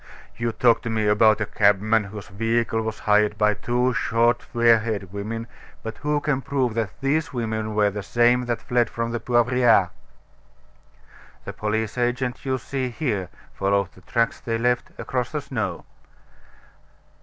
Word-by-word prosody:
You 115 0 -1
talk 115 +1 +3
to 115 - -4
me 110 -1 0
about 105 +1 +4
a - - +1
cabman 105 +2 +2
whose 100 -2 -9
vehicle 115 +2 0
was 110 -1 -4
hired 105 0 +3
by 105 0 +3
two 125 +4 0
short, 120 0 +2
fair 115 -2 +3
haired 105 -4 -4
women: 110 +3 -4 0.4
but 110 0 -6
who 150 0 0
can 145 -2 -1
prove 130 -4 -1
that 110 -4 -3
these 145 +2 0
women 110 -3 -3
were 105 -1 +3
the 105 +1 -5
same 120 +4 +2
that 120 -2 -2
fled 120 -3 +1
from 115 0 -3
the 120 - -2
Poivriere?" 120 -4 +3 1.5
"The - - -6
police 110 +2 -2
agent 125 +1 -1
you 130 -1 0
see 130 0 -3
here 115 - -2 0.2
followed 100 -1 0
the 95 - -18
tracks 115 +3 0
they 115 -1 -2
left 125 +1 0
across - - -3
the - - -2
snow." - - -4
115 Hz, 160 wpm, -23 LUFS, 105-125 Hz, 1.5 s, about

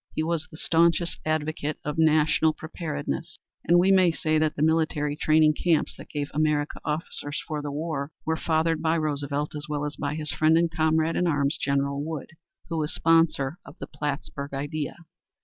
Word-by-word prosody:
He 155 - 0
was 160 -1 -1
the 155 - -12
staunchest 170 +1 +2
advocate 155 -1 -1
of 150 +2 -3
national 155 0 +4
preparedness, 160 0 -5 0.3
and 175 - +6
we 185 +2 +5
may 185 -3 +5
say 155 -1 0
that 155 -1 +1
the 145 - 0
military 155 -2 +1
training 155 0 +4
camps 165 +1 +1
that - - -12
gave 145 -1 -4
America 150 -1 0
officers 150 -1 -3
for 155 -2 -3
the 145 -1 -4
war 150 -1 -3
were 160 - +1
fathered 160 0 +1
by 160 0 +2
Roosevelt 145 -1 -2
as 150 0 -5
well 150 -1 -1
as 150 - -5
by 145 0 -2
his 155 -1 -3
friend 155 +1 +3
and 170 0 +2
comrade 160 0 +1
in 180 - +1
arms, 145 -2 +1
General 140 +1 0
Wood, 155 -3 -5 0.4
who 165 -1 -2
was 150 0 -1
sponsor 165 -2 +2
of - - -13
"The - - -6
Plattsburg 145 -1 -5
Idea." 145 +1 -3
155 Hz, 185 wpm, -26 LUFS, 145-160 Hz, 0.4 s, and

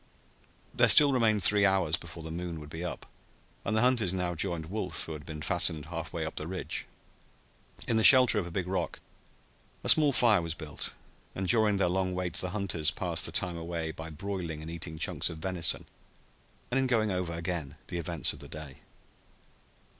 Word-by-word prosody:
There - - +4
still 145 -2 +7
remained 110 -5 +3
three 105 +2 +7
hours 95 -5 +2
before 85 -3 -9
the 80 - -7
moon 85 -1 -5
would 75 0 -11
be 80 +3 -6
up, 90 - -6 0.6
and 110 - -1
the - - +3
hunters 120 -7 +2
now 90 -1 -2
joined 85 -1 -3
Wolf, 90 -2 -3
who - - -8
had 75 -1 -10
been 75 -2 -7
fastened 80 -2 0
half 80 -1 -6
way 85 -2 -3
up 80 - -7
the 75 - -5
ridge. 95 +1 -4 1.0
In 115 - +1
the 110 - +2
shelter 125 -4 +8
of 90 - -4
a - - -9
big 95 +1 -2
rock 95 +1 -3 0.8
a - - -1
small 150 -2 +7
fire 115 -7 +4
was 85 -1 -4
built, 80 -3 -6 0.4
and 95 0 -3
during 110 -1 +3
their 95 - +2
long 95 +1 -1
wait 90 -2 -3
the 90 +2 +5
hunters 90 -6 -1
passed - - -2
the - - -8
time 90 -2 0
away 85 -1 -4
by 80 +1 -8
broiling 85 -2 -5
and 80 - -7
eating 85 -1 -6
chunks - - 0
of 80 - -8
venison 85 0 0 0.9
and 135 - +1
in 130 - +1
going 110 -4 +1
over 90 -2 -2
again 85 -4 -4
the 85 - -3
events 85 -2 0
of - - -13
the - - -11
day. 75 -4 -9
90 Hz, 200 wpm, -29 LUFS, 80-100 Hz, 1.0 s, shelter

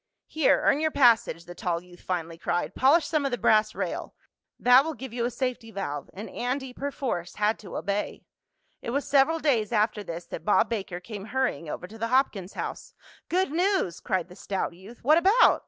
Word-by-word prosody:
"Here, 310 -2 +2
earn 285 - +4
your 315 0 +2
passage," 235 - +3
the 175 - -9
tall 175 -1 -2
youth 175 -1 -16
finally 170 -2 -4
cried. 175 - -1
"Polish 295 +6 +4
some 310 -3 0
of 275 - +1
the 245 - -2
brass 215 -1 +3
rail. - - -4 0.4
That 250 +2 +7
will 320 0 -4
give 265 -3 -8
you 235 -1 -1
a - - +1
safety 250 -2 -3
valve," 145 -9 -5
and 205 +4 -6
Andy, 255 +1 -3
perforce, 255 -11 -4
had 210 +1 +1
to 195 -5 -7
obey. 200 +1 -3 0.6
It - - -5
was 280 +4 -1
several 285 +4 +4
days 250 -9 +1
after 210 -1 +1
this 170 -2 -6
that - - -7
Bob 210 - +3
Baker 195 -6 -3
came 205 +1 -8
hurrying 230 - -1
over 175 - -5
to 220 +4 -12
the 230 - -1
Hopkins 230 -7 +1
house. - - -6 0.3
"Good 365 -3 +1
news!" 355 - +1
cried 185 -3 -1
the 180 - -13
stout 195 -2 -3
youth. 195 +7 -14
"What 305 +6 +6
about?" 395 +8 +5
230 Hz, 200 wpm, -27 LUFS, 185-270 Hz, 0.6 s, That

